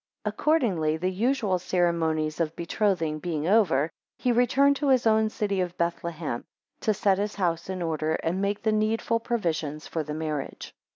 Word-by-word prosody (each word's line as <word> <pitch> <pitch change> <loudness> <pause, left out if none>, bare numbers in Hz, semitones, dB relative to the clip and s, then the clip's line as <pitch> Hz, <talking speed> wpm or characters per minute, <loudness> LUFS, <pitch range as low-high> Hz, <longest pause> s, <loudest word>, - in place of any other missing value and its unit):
6 210 - -1
Accordingly, 205 - +1
the 185 +3 -1
usual 210 -2 +1
ceremonies 165 -4 0
of 165 -1 -1
betrothing 170 -3 0
being 160 -1 -2
over, 170 -8 +3 0.3
he 250 - +1
returned 260 +4 +4
to 290 - -1
his 255 -3 +4
own 220 -1 +4
city 200 -3 -1
of 180 -1 -3
Bethlehem, 170 -5 -2 0.4
to 220 - +1
set 200 -2 +2
his 205 +1 -2
house 170 -3 -1
in 185 -2 -3
order, 160 -1 0
and 175 +4 -2
make 200 +2 -1
the 220 - +2
needful 220 +2 +1
provisions 165 -10 -2
for 165 - -3
the 150 0 -5
marriage. 155 -3 -4
180 Hz, 170 wpm, -26 LUFS, 160-215 Hz, 0.4 s, returned